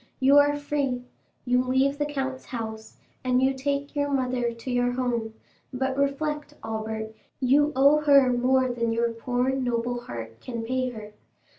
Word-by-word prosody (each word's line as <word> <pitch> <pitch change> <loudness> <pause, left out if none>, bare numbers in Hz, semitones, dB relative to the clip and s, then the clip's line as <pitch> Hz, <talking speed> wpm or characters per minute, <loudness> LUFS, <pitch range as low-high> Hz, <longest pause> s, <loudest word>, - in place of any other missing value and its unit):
You 275 +2 +6
are 290 0 +3
free, 280 -4 -2 0.4
you 250 0 +3
leave 265 +3 +1
the 295 - 0
count's 270 -2 -4
house, 220 -2 -6 0.3
and 255 -1 +2
you 265 +1 +3
take 280 +2 -3
your 285 0 0
mother 255 -3 0
to 230 +2 -7
your 245 0 +1
home; 235 -3 -2 0.4
but 265 0 -1
reflect, 290 +2 -1
Albert, 220 0 -4 0.3
you 285 +3 +3
owe 280 +3 +5
her 280 -4 +5
more 255 +1 +3
than 235 -2 -1
your 230 +1 +1
poor 245 +3 -1
noble 245 -2 -1
heart 115 - -8
can 235 -2 -5
pay 255 +2 -1
her. 215 -3 -9
255 Hz, 160 wpm, -26 LUFS, 235-275 Hz, 0.4 s, You